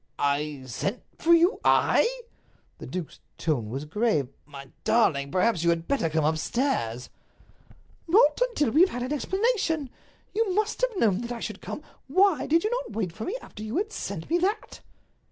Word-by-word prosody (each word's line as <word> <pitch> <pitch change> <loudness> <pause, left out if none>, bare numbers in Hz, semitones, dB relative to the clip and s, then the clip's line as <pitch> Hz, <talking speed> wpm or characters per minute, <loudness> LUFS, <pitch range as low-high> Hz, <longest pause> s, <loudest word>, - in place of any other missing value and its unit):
"I 145 -1 -1
sent 125 - -3 0.2
for 335 - +2
you—I?" 345 +6 +4 0.7
The - - -8
duke's 180 -4 -6 0.2
tone 130 -10 -1
was 135 +5 -4
grave. 160 - 0 0.2
"My 140 -2 -10
darling, 175 -12 +2
perhaps 185 -1 +2
you 170 - +3
had 170 0 0
better 275 -13 +1
come 155 -1 +1
upstairs." 155 - -1 1.0
"Not 425 +9 +4
until 295 - 0
we 305 - +4
have 370 - +6
had 245 0 -4
an 255 +4 -2
explanation. 365 - 0 0.4
You 415 -4 0
must 430 +3 0
have - - 0
known 210 - +2
that 240 0 -5
I 240 - -4
should 215 -3 -6
come. 300 - -6 0.2
Why 370 +4 +3
did 330 +2 +3
you 430 - 0
not 485 - -3
wait 205 -5 -2
for 220 - -6
me 445 - -2
after - - -11
you 220 +6 -3
had 425 +3 -1
sent 195 - -5
me 345 - +2
that?" 405 +5 -2
235 Hz, 175 wpm, -26 LUFS, -, 1.0 s, have